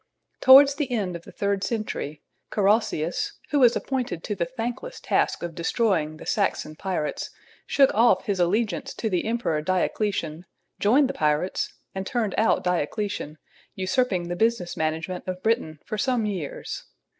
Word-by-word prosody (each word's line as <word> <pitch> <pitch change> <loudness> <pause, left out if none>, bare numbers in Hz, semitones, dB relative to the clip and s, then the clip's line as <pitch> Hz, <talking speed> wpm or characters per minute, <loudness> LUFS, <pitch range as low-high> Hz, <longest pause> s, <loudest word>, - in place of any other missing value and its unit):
Towards 275 +2 +8
the 280 -2 -3
end 200 -7 -1
of 170 - -8
the - - -11
third 200 -1 -1
century 210 -10 -3 0.3
Carausius, 200 -5 +1 0.2
who 290 - +3
was 245 -2 +6
appointed 250 -11 -2
to 210 - -2
the 175 -4 -2
thankless 255 - -5
task - - 0
of 170 -1 -4
destroying 165 -3 0
the - - -11
Saxon 155 - 0
pirates, 175 -3 -3 0.4
shook 275 -2 +4
off 235 +3 +4
his 200 -3 -1
allegiance 195 +2 0
to 220 - -2
the 180 - 0
emperor 225 -9 0
Diocletian, 185 -1 -1 0.3
joined 260 +7 +4
the 270 - -3
pirates 150 +4 0 0.2
and 190 0 -4
turned 230 -7 -1
out 225 - +3
Diocletian, 180 -1 -2 0.4
usurping 185 -1 0
the 175 - -3
business 220 -3 0
management 160 +4 -2
of 185 0 -4
Britain 220 -9 0
for 215 - -4
some 250 -3 +1
years. 185 -8 -4
200 Hz, 155 wpm, -25 LUFS, 170-235 Hz, 0.4 s, Towards